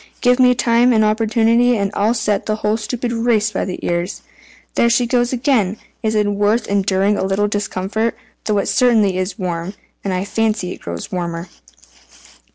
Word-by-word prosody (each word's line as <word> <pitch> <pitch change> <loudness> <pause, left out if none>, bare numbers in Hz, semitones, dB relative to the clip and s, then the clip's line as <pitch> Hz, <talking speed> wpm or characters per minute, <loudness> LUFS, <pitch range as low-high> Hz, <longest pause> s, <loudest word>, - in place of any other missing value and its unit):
Give 250 +1 +3
me 250 -1 +5
time 240 +1 +3
and 220 -1 +3
opportunity, 225 +2 +2
and 200 -1 -1
I'll 215 +4 +1
set 210 -3 -1
the 215 - 0
whole 215 0 0
stupid 235 +2 -3
race 230 -2 +1
by 190 - -2
the 185 - -4
ears. 175 +2 -2 0.5
There 235 - +3
she 240 +1 +2
goes 240 0 +1
again! 235 -6 +1 0.2
It 220 -1 -1
is 210 -1 +2
worth 205 +3 +1
enduring 200 0 +1
a - - -1
little 195 +2 +1
discomfort, 205 +2 -2 0.3
though 210 -1 +1
it 200 - 0
certainly 220 -7 +3
is 185 +4 -3
warm, 180 0 -4 0.3
and 195 - -2
I 185 +1 -1
fancy 215 -4 -1
it - - -9
grows 85 -1 -6
warmer." 170 -1 -4
215 Hz, 175 wpm, -18 LUFS, 195-235 Hz, 0.5 s, me